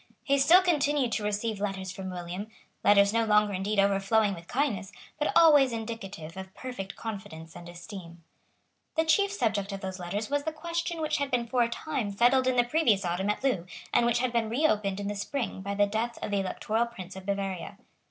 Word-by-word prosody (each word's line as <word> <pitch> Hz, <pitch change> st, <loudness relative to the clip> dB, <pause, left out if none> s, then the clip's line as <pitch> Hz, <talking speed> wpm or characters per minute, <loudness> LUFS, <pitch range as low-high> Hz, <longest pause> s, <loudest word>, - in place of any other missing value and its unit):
He 280 Hz, 0 st, +2 dB
still 345 Hz, +7 st, +7 dB
continued 290 Hz, -7 st, +2 dB
to 215 Hz, -, -1 dB
receive 210 Hz, 0 st, -2 dB
letters 190 Hz, -2 st, -3 dB
from 190 Hz, 0 st, -6 dB
William; 180 Hz, +3 st, -5 dB, 0.4 s
letters 200 Hz, 0 st, +5 dB
no 230 Hz, 0 st, +3 dB
longer 210 Hz, -1 st, +3 dB
indeed 195 Hz, +3 st, -2 dB
overflowing 200 Hz, +2 st, +3 dB
with 170 Hz, -1 st, -10 dB
kindness, 240 Hz, -8 st, -1 dB, 0.3 s
but 295 Hz, -, +1 dB
always 295 Hz, -6 st, +7 dB
indicative 215 Hz, -8 st, -6 dB
of 190 Hz, 0 st, -8 dB
perfect 225 Hz, -7 st, -6 dB
confidence 195 Hz, -7 st, -7 dB
and 175 Hz, 0 st, -10 dB
esteem. 175 Hz, -1 st, -10 dB, 0.7 s
The 320 Hz, 0 st, +2 dB
chief 400 Hz, +5 st, +3 dB
subject 220 Hz, -, -1 dB
of 195 Hz, 0 st, -5 dB
those 190 Hz, -1 st, -5 dB
letters 200 Hz, +5 st, -3 dB
was 285 Hz, 0 st, 0 dB
the 315 Hz, -, -2 dB
question 335 Hz, +1 st, -3 dB
which 310 Hz, 0 st, 0 dB
had 280 Hz, -2 st, -1 dB
been 245 Hz, -3 st, 0 dB
for 245 Hz, +1 st, +1 dB
a 235 Hz, -, +2 dB
time 255 Hz, -3 st, -3 dB
settled 245 Hz, +6 st, +3 dB
in 255 Hz, -, +2 dB
the 245 Hz, -, +5 dB
previous 240 Hz, -, +2 dB
autumn 180 Hz, +3 st, -1 dB
at 210 Hz, -, -1 dB
Loo, 200 Hz, -11 st, 0 dB, 0.3 s
and 235 Hz, -, +4 dB
which 240 Hz, 0 st, +2 dB
had 245 Hz, 0 st, 0 dB
been 230 Hz, -2 st, +1 dB
reopened 215 Hz, -7 st, +1 dB
in 200 Hz, -, -3 dB
the 205 Hz, -, -2 dB
spring 215 Hz, +1 st, -3 dB
by 200 Hz, +1 st, -3 dB
the 205 Hz, 0 st, +4 dB
death 220 Hz, +3 st, -2 dB
of -, -, -3 dB
the 200 Hz, -, +1 dB
Electoral 220 Hz, +4 st, -1 dB
Prince 190 Hz, -5 st, -9 dB
of 190 Hz, 0 st, -10 dB
Bavaria. 195 Hz, -2 st, -3 dB
210 Hz, 205 wpm, -28 LUFS, 195-255 Hz, 0.7 s, still